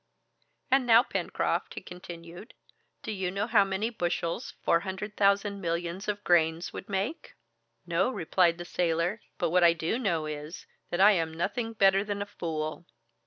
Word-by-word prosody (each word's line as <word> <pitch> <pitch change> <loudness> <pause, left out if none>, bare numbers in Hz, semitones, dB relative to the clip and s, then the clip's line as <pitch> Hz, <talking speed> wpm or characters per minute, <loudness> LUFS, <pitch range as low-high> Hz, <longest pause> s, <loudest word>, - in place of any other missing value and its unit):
"And 265 -1 +4
now, 230 +1 +7
Pencroft," - - -2
he - - -5
continued, 175 +3 -10 0.5
"do - - -4
you 190 -3 -2
know 200 +3 -1
how 220 -3 +5
many 195 +4 -2
bushels 175 -4 -2
four 170 - +4
hundred 200 +3 -6
thousand 200 0 +2
millions 170 +2 -3
of 205 0 -2
grains 165 -1 +2
would - - -8
make?" 205 - -3 0.5
"No," 175 +6 +1
replied 175 -5 +2
the 175 - -7
sailor; 175 +4 0 0.2
"but 170 -3 0
what 180 0 +4
I 170 -1 +7
do 170 +8 -2
know 170 -10 0
is, 150 +2 -7 0.2
that 175 - 0
I 205 +2 +8
am 165 -5 0
nothing 225 +7 -2
better 195 -2 +4
than 205 -1 -3
a - - -9
fool!" 165 -5 -4
185 Hz, 165 wpm, -29 LUFS, 170-205 Hz, 0.5 s, I